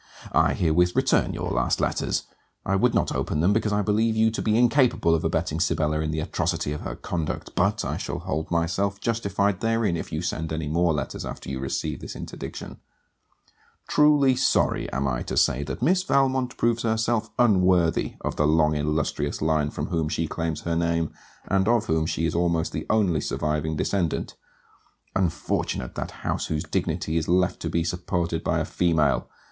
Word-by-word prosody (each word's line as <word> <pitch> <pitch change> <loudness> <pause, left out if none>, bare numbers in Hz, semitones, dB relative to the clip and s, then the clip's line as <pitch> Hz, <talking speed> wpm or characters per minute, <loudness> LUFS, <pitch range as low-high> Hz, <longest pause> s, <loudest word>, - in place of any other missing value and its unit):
I - - +3
herewith 90 +2 +2
return - - +2
your - - -3
last 60 0 +1
letters. - - 0 0.4
I 95 - +1
would 120 +5 +2
not - - +1
open 75 - -1
them, 90 +6 +3
because 110 0 +1
I 105 0 +1
believe 110 +3 +1
you 110 0 +3
to 110 - -3
be 110 0 +2
incapable 120 - +3
of 80 - +1
abetting 80 - -1
Sibella 75 -2 +1
in 80 0 -1
the 80 0 -1
atrocity 80 -1 -1
of 75 - -6
her - - -5
conduct, 80 -3 -4
but - - +1
I - - -2
shall - - -4
hold 80 +3 -3
myself 90 +4 0
justified 100 -4 0
therein 115 -5 +1
if 85 - -5
you 80 +2 -3
send 80 -2 -3
any 80 -1 -2
more 85 +3 +2
letters 70 -4 -3
after - - -6
you 65 - -3
receive 65 -1 -3
this - - -8
interdiction. - - -7 1.1
Truly 145 -3 +4
sorry 130 - +1
am 70 +1 -1
I - - -1
to - - -4
say 65 - +3
that - - -5
Miss 180 +6 +3
Valmont 135 -7 +1
proves 115 0 +1
herself 110 0 0
unworthy 90 -7 +3
of - - -3
the 75 - +3
long 75 0 +3
illustrious 75 0 -1
line 80 -1 +1
from 75 - -4
whom 80 -3 0
she 80 +1 -1
claims 80 -1 -3
her 85 -1 -2
name, 85 -1 0 0.4
and 95 0 +2
of 115 -1 +3
whom 80 0 +1
she 80 - -1
is 80 - 0
almost 85 -1 +1
the - - -5
only 95 -8 +2
surviving 75 +2 -1
descendant. 85 0 -1 0.8
Unfortunate 85 -8 -1
that - - -4 0.2
house - - -1
whose 75 -1 -2
dignity 80 +1 -1
is 80 - -1
left 90 +1 +2
to - - -3
be 85 - 0
supported 85 -1 -2
by - - +1
a - - -1
female! 80 -5 +1
85 Hz, 185 wpm, -25 LUFS, 80-105 Hz, 1.1 s, Truly